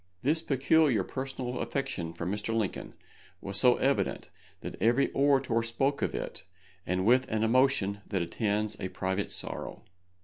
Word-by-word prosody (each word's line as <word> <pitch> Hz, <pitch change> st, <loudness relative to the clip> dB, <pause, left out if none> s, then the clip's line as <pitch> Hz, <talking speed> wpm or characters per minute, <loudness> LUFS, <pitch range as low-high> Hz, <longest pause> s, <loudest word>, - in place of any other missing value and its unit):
This 155 Hz, +5 st, +2 dB
peculiar 135 Hz, -, +3 dB
personal 130 Hz, +1 st, -4 dB
affection 135 Hz, -12 st, -3 dB
for 85 Hz, 0 st, -6 dB
Mr. 105 Hz, +4 st, -2 dB
Lincoln 110 Hz, -4 st, -2 dB, 0.4 s
was 100 Hz, -1 st, -1 dB
so 125 Hz, -1 st, +6 dB
evident 135 Hz, +1 st, 0 dB, 0.3 s
that -, -, -6 dB
every 120 Hz, +5 st, +3 dB
orator 135 Hz, -4 st, +2 dB
spoke 135 Hz, +5 st, 0 dB
of -, -, -1 dB
it, -, -, -4 dB, 0.4 s
and 90 Hz, +1 st, 0 dB
with 125 Hz, +3 st, +4 dB
an 110 Hz, 0 st, 0 dB
emotion 110 Hz, -4 st, +2 dB
that 95 Hz, -4 st, -1 dB
attends 105 Hz, +3 st, -1 dB
a 95 Hz, -, -3 dB
private 95 Hz, +2 st, -2 dB
sorrow. -, -, -5 dB
115 Hz, 145 wpm, -29 LUFS, 100-135 Hz, 0.4 s, so